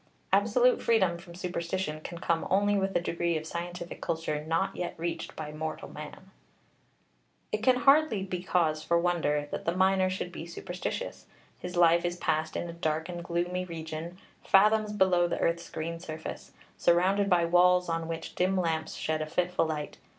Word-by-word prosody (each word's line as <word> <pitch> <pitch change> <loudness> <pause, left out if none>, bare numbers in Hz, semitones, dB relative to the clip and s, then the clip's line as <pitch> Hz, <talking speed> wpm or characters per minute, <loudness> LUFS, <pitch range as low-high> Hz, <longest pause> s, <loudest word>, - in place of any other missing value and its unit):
Absolute 225 +5 +4
freedom 190 -7 +2
from 170 -1 -12
superstition 175 -2 -3
can 170 - -7
come 170 -1 0
only 205 +2 +3
with 195 -1 0
a - - +5
degree 170 -1 -1
of 155 - -6
scientific 175 +1 -6
culture 160 -2 -2
not 165 +4 0
yet 175 - -4
reached 170 +1 -4
by 150 -1 -6
mortal 155 +1 -5
man. 155 +6 -10 1.2
It 215 - -1
can 255 +2 +5
hardly 275 -5 +4
be 185 -2 -4
cause 165 -4 +1
for 170 +2 +2
wonder 165 -4 +1
that - - -4
the 170 - 0
miner 190 0 +3
should 185 -1 -4
be 170 -1 -7
superstitious. 175 - -5 0.3
His 180 0 -6
life 170 0 +5
is 175 0 -2
passed 155 -2 -1
in 175 - -2
a 170 - -6
dark 160 0 -2
and 175 -1 -5
gloomy 175 +1 -1
region, 165 0 -6 0.3
fathoms 215 +2 +4
below 185 -4 +3
the - - -2
earth's 170 0 0
green 165 +1 -4
surface, 160 -2 -7 0.3
surrounded 190 +4 +3
by 175 -2 +4
walls 180 +1 +4
on 165 -1 -2
which 165 0 -5
dim 185 +1 +1
lamps 165 -3 -1
shed 155 0 -1
a 155 - -2
fitful 180 +1 0
light. 150 -2 -4
175 Hz, 175 wpm, -29 LUFS, 165-185 Hz, 1.2 s, a